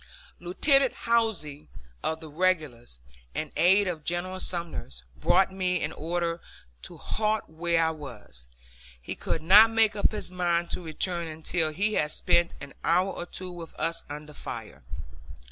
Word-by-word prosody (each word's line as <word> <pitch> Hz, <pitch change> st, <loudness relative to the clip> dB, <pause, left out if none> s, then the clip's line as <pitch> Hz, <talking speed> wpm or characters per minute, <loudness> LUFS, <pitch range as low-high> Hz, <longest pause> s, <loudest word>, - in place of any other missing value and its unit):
Lieutenant 270 Hz, -, +3 dB
Howze, 220 Hz, -11 st, 0 dB, 0.4 s
of 160 Hz, +1 st, -1 dB
the 160 Hz, -, -8 dB
regulars, 150 Hz, -, -1 dB, 0.4 s
an 155 Hz, -, -3 dB
aide 190 Hz, +4 st, +5 dB
of 165 Hz, -4 st, -3 dB
General 180 Hz, +3 st, -2 dB
Sumner's, 165 Hz, -, -4 dB
brought 190 Hz, -, +3 dB
me 180 Hz, -2 st, 0 dB
an 150 Hz, -, -1 dB
order 170 Hz, +1 st, -2 dB, 0.4 s
to -, -, -10 dB
halt 215 Hz, 0 st, -1 dB
where 165 Hz, +1 st, +1 dB
I 160 Hz, -, +1 dB
was; 120 Hz, -, -10 dB, 0.5 s
he -, -, -6 dB
could 160 Hz, -, -3 dB
not 205 Hz, +6 st, +8 dB
make 225 Hz, -2 st, +3 dB
up 205 Hz, -, +2 dB
his 210 Hz, -4 st, -3 dB
mind 175 Hz, -1 st, 0 dB
to -, -, -2 dB
return 170 Hz, +1 st, -3 dB
until 160 Hz, +1 st, 0 dB
he 205 Hz, +7 st, 0 dB
had 150 Hz, -6 st, +1 dB
spent 170 Hz, +2 st, +2 dB
an 140 Hz, -1 st, -9 dB
hour 180 Hz, +4 st, +3 dB
or 175 Hz, -, -6 dB
two 185 Hz, 0 st, -6 dB
with 170 Hz, -2 st, -9 dB
us 165 Hz, 0 st, -1 dB
under 150 Hz, +1 st, -8 dB
fire. -, -, -8 dB
170 Hz, 155 wpm, -27 LUFS, 155-185 Hz, 0.5 s, not